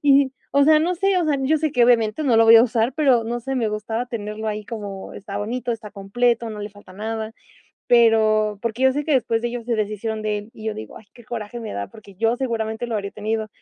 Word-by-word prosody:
Y, 275 -2 +4 0.2
o 280 0 +5
sea, 310 0 +6
no 355 +3 +1
sé, 390 +1 +2
o 345 - +1
sea, 295 -2 +1
yo 310 +4 +3
sé 310 -2 -1
que 245 -4 +4
obviamente 230 +1 +2
no 240 -4 +3
lo 225 - +6
voy 225 0 +9
a 225 - +8
usar, 240 0 +1
pero 260 -7 +3
no 240 +1 -3
sé, 270 +3 -4
me 225 -3 +1
gustaba 220 +3 -3
tenerlo 220 -2 -5
ahí, 210 0 -4
como 200 -4 -7
está 200 0 -7
bonito, 240 +3 -2
está 220 -2 -7
completo, 230 +4 0
no 210 -1 -7
le 205 - -5
falta 205 -2 -16
nada, 220 +2 -4 0.6
pero 215 -3 +4
porque 235 +2 -2
yo 265 - +6
sé 295 +1 -1
que 305 - +1
después 230 -3 +1
de 240 - -1
ellos 240 -1 -6
se 240 - 0
deshicieron 215 +1 -3
de 210 -1 0
él, 210 +2 -12
y 220 - -11
yo 220 - -1
digo: 110 - -9
"Ay, 220 - -17
qué 240 - -16
coraje 230 0 -6
me 220 - -6
da", 100 0 -4
porque 205 -3 -15
yo 225 +4 +1
seguramente 225 -2 -2
lo 225 - -2
habría 200 -1 -3
tenido. 220 +1 -3
225 Hz, 255 wpm, -22 LUFS, 215-245 Hz, 0.6 s, voy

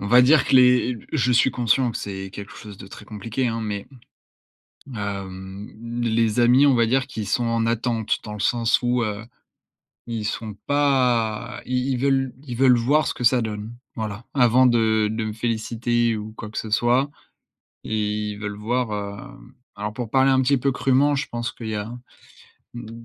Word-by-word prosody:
on 100 - -4
va 125 +3 +6
dire 140 +3 +5
que - - +1
les, 125 -1 +5
heu, - - -9
b - - -14
je 125 -4 +2
suis 125 +2 +4
conscient 125 +1 +1
que - - -5
c'est 95 -1 -6
quelque 100 0 -9
chose 105 -2 -11
de - - -10
très 95 - -12
compliqué, 115 +4 -3
hein, 115 0 -3
mais 105 -2 -4 1.1
hem, 100 -1 -6 0.3
les 115 0 +1
amis, 125 +4 +5
on 140 - +5
va 115 -1 +3
dire 130 +3 +1
qu'ils 110 -7 -6
sont 120 - +1
en 115 -1 0
attente, 115 -1 0
dans 105 - -7
le 105 - -7
sens 115 +1 +2
où 120 0 +1
heu, 105 0 -4 0.8
ils 115 -2 -4
sont 110 0 -4
pas 125 -5 +1
i 125 +1 -1
ils 130 - 0
veulent 135 -1 +1
ils 125 - -5
veulent 130 -1 +5
voir 140 +7 +2
ce - - -2
que 125 - -6
ça 125 +1 +5
donne, 105 0 -5 0.2
voilà, 110 +1 -5
avant 125 0 +5
de 110 -3 +3
de 110 0 -2
me 110 - -3
féliciter 115 +1 -1
ou 105 +1 -7
quoi 105 - -7
que - - -5
ce 110 - -5
soit 120 +5 +2 0.7
et 110 - -3 0.4
ils 100 - -8
veulent 105 -1 -5
voir, 120 +2 -1 0.4
hem - - -16 0.2
alors 105 +1 -4
pour 120 -2 -5
parler 135 0 +4
un 130 - +4
petit 135 +2 +3
peu 135 +2 0
crûment, 135 +3 +2
je 135 - -2
pense 120 -2 -3
qu'il 115 - -8
y 110 - -2
a, 105 +1 -4 0.9
mmh, 115 0 -9
115 Hz, 200 wpm, -23 LUFS, 110-125 Hz, 1.1 s, va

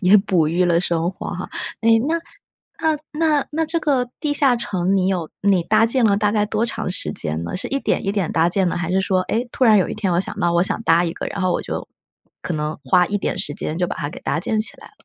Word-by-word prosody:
也 190 +1 +6
哺 185 -6 +2
育 175 +3 +2
了 170 -1 +3
生 170 -1 0
活 185 - -8
哈。 180 +1 -5 0.3
诶， 225 0 +5
那 310 +7 0 0.7
那 310 -2 +2
那 305 -2 +1
那 320 +2 -1
这 330 +2 -1
个 260 -5 +1
地 300 -2 0
下 275 -3 +3
城 195 -4 0
你 185 -1 +2
有 175 -5 -1
你 195 -3 +3
搭 215 +5 +3
建 240 0 +3
了 200 -2 +4
大 210 0 +2
概 210 -1 +1
多 220 +2 0
长 235 - -3
时 75 - -2
间 80 +1 -2
呢？ 85 - -4
是 - - -3
一 275 +1 -1
点 - - 0
一 195 - +1
点 195 -6 -1
搭 165 +2 +3
建 185 0 +1
的， - - -2
还 175 0 -2
是 190 - +2
说， 190 -1 +1
诶， 235 +6 -2
突 260 - +1
然 220 -3 +6
有 185 - +1
一 - - -4
天 200 -4 -1
我 170 - +2
想 190 - -6
到 175 - +2
我 170 +1 +3
想 195 - -2
搭 170 -2 +4
一 165 - -2
个， - - -5
然 200 - -5
后 185 - +2
我 - - 0
就 - - -5 0.5
可 175 - -3
能 150 +1 -3
花 180 -2 +4
一 205 0 -1
点 - - -2
时 145 - -4
间 155 - -4
就 180 0 0
把 - - -5
它 145 - -3
给 - - -9
搭 - - -1
建 215 +4 0
起 215 - -4
来 - - -14
了？ - - -20
190 Hz, 300 characters per minute, -21 LUFS, 175-225 Hz, 0.7 s, 也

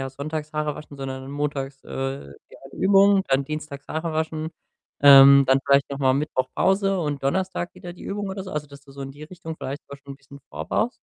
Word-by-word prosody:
ja, 135 0 -4
sonntags 150 +3 -5
Haare 150 -1 -2
waschen, 150 -1 -11
sondern 135 0 -6
montags, 140 -2 -4
äh, 135 - -4 0.2
ja - - -14
Übung, 195 0 +4
dann 135 +1 +2
dienstags 150 -1 -7
Haare 160 +1 -3
waschen, 160 0 -2 0.5
ähm, 140 0 +9
dann 130 +1 +4
vielleicht 140 0 +3
noch 140 - -4
mal 130 -2 +3
Mittwoch 135 -2 -1
Pause 195 0 +2
und 150 -3 -3
Donnerstag 180 +4 -2
wieder 175 -1 -9
die 175 - -14
Übung“, 205 0 -4
oder 190 0 -5
so. 185 - -8
Also, 150 -1 -3
dass 140 0 -13
du 140 - -18
so 140 - -8
in 135 0 -7
die 145 +2 -13
Richtung 165 -1 -8
vielleicht 140 +2 -6
da 140 - -9
schon 140 0 -11
bisschen 140 0 -15
vorbaust? 245 +3 -1
145 Hz, 210 wpm, -24 LUFS, 135-165 Hz, 0.5 s, ähm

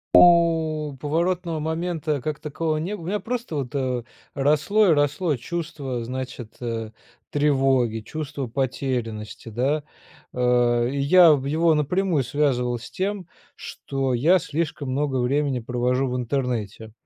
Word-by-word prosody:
О, 160 -4 +5
поворотного 165 +3 -1
момента 160 -1 -2
как 150 +4 -4
такового 155 +1 -2
не 175 +7 -3
бы 175 - -10
У - - -8
меня 205 +4 -1
просто 240 -7 -4
вот 140 -1 -4 0.6
росло 150 +10 +3
и 170 - +6
росло 145 +2 +1
чувство 145 -4 -4
значит, 125 -2 -6
э, 115 -2 -3 0.4
тревоги, 135 -6 +2
чувство 140 +2 -5
потерянности, 120 -4 -3
да. 135 +7 0 0.5
Э, 120 -1 +2
и 140 - -3
я 165 +3 +7
в 135 -2 -1
его 160 +3 +3
напрямую 160 +1 +1
связывал 125 -3 0
с 115 - -10
тем, 195 -1 -3 0.3
что 135 -2 -3
я 165 +10 +4
слишком 155 -4 -3
много 140 0 0
времени 135 +1 +1
провожу 125 +2 0
в 125 - -2
интернете. 120 -4 -3
145 Hz, 135 wpm, -24 LUFS, 125-160 Hz, 0.6 s, я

